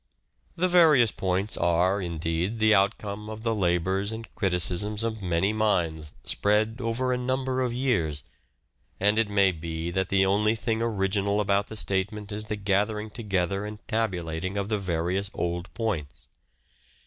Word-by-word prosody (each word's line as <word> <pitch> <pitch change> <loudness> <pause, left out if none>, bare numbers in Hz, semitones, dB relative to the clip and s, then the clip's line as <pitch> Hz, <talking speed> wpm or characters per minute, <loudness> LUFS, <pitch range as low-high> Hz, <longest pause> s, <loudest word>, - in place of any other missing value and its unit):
The 180 +2 +2
various 155 - +5
points 95 +2 0
are, 90 +3 +2
indeed, 85 +4 -2
the 110 0 +4
outcome 100 +1 0
of 110 0 -7
the 115 -1 +1
labours 95 +1 +1
and 110 0 -6
criticisms 95 +3 +1
of 110 -2 -3
many 90 +3 +1
minds 85 -8 0
spread 110 +2 +1
over 125 +2 0
a 125 - -1
number 130 +1 -1
of 125 -2 0
years, 100 - 0 0.8
and 105 +3 +3
it 115 -2 +1
may 100 -2 +4
be 80 0 -4
that 95 +1 -1
the 95 0 +3
only 105 +3 +2
thing 115 0 -1
original 100 -2 0
about 100 0 +1
the 110 - -8
statement 105 +1 -2
is 105 +1 -4
the 105 0 -3
gathering 105 +2 0
together 100 -3 -1
and 105 0 -6
tabulating 95 -5 -2
of 100 +1 -2
the 105 -2 0
various 90 +2 -1
old 85 +1 -3
points. 80 - -3
100 Hz, 155 wpm, -26 LUFS, 90-110 Hz, 0.8 s, various